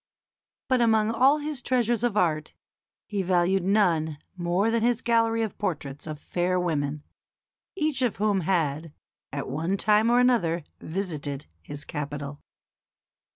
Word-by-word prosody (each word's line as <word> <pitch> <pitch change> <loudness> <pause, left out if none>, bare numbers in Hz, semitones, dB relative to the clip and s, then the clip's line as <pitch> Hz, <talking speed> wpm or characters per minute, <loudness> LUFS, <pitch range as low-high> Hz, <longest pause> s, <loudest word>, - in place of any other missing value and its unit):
But 255 -2 +2
among 220 -1 +3
all 260 +6 +4
his 295 -3 -4
treasures 240 -3 +1
of 240 -4 0
art 155 -5 0 0.5
he 205 -2 -2
valued 185 +1 +2
none 170 -6 +2 0.2
more 180 +5 +1
than 230 0 +1
his 240 0 +2
gallery 230 -2 +2
of 220 - -5
portraits 145 -7 -3
of 155 -1 -5
fair 180 +3 0
women, 150 -4 -1 0.7
each 310 -6 0
of 245 -4 +1
whom 205 -1 +1
had, 160 -3 -1 0.4
at 140 - -4
one 165 +8 -1
time 215 +3 +3
or 240 +1 +5
another, 175 -10 +2 0.2
visited 155 -6 -4 0.2
his 145 0 -6
capital. 145 -1 -5
190 Hz, 140 wpm, -26 LUFS, 155-230 Hz, 0.7 s, or